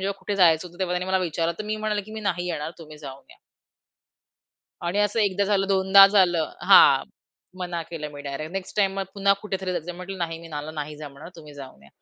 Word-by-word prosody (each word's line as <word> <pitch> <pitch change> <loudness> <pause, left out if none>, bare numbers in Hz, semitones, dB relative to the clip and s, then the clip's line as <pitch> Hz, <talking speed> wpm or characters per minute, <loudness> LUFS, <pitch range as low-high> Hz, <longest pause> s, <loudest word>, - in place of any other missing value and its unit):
जेव्हा 195 +1 -3
कुठे 205 - -4
जायचं 170 -2 +4
होतं, 175 +2 -19
तेव्हा 185 -2 -1
त्यांनी 180 - -5
मला 190 0 +1
विचारलं 165 0 -1
तर 215 - -5
मी 215 0 -3
म्हणेल, 215 -1 -2
की 215 - -11
"मी 220 - -6
नाही 180 -4 -2
येणार, 160 -3 -3
तुम्ही 155 -2 -12
जाऊन 140 -2 -10
या." - - -17 1.5
आणि 175 +3 -2
असं 205 +2 +1
एकदा 200 -1 +1
झालं, 195 -1 +1
दोनदा 195 0 +7
झालं 180 -5 +2
हां, - - +7 0.5
मना 175 -2 -4
केलं 160 -2 -7
मी 145 - -9
डायरेक्ट. 145 +3 -6
नेक्स्ट 195 -1 -6
टाईम 195 -2 +2
मग 195 - -1
पुन्हा 200 0 +3
कुठेतरी 190 -3 -3
जायचं 175 -1 -4
आहे, 175 - -9
म्हटलं, 185 +1 -8
"नाही, 165 -2 -3
मी 165 0 -12
मला 150 -1 -6
नाही 150 -1 -6
जमणार, 145 +1 -10
तुम्ही 150 -3 -13
जाऊन 135 - -12
या" 70 - -18
180 Hz, 225 wpm, -24 LUFS, 155-195 Hz, 1.5 s, दोनदा